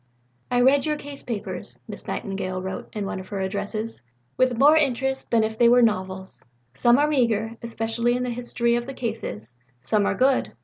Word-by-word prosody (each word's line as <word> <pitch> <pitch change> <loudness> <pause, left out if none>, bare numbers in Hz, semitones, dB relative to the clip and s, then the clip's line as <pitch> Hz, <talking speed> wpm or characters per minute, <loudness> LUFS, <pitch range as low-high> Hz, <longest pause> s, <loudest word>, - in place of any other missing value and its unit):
"I 245 0 +2
read 275 +3 +4
your 300 0 0
Case 285 -1 -9
papers," 225 -4 -3
Miss - - -9
Nightingale 195 -3 -3
wrote 190 +1 -5
in 210 -2 -4
one 190 - -4
of 185 - -9
her 200 0 -4
Addresses, 205 - -3 0.3
"with 255 -2 +2
more 290 +5 +7
interest 265 -2 0
than 230 -2 +3
if 220 0 -3
they 235 -1 +6
were 245 0 +6
novels. 190 -3 -1 0.3
Some 240 - +4
are 295 +1 +3
meagre, 230 -6 +1
especially 235 +1 -1
in 250 - -2
the 250 - -2
history 235 0 0
of 240 +1 -2
the 275 - -6
cases. 165 - -5 0.2
Some 200 - +1
are - - 0
good. 260 +1 +2
235 Hz, 190 wpm, -24 LUFS, 200-250 Hz, 0.3 s, more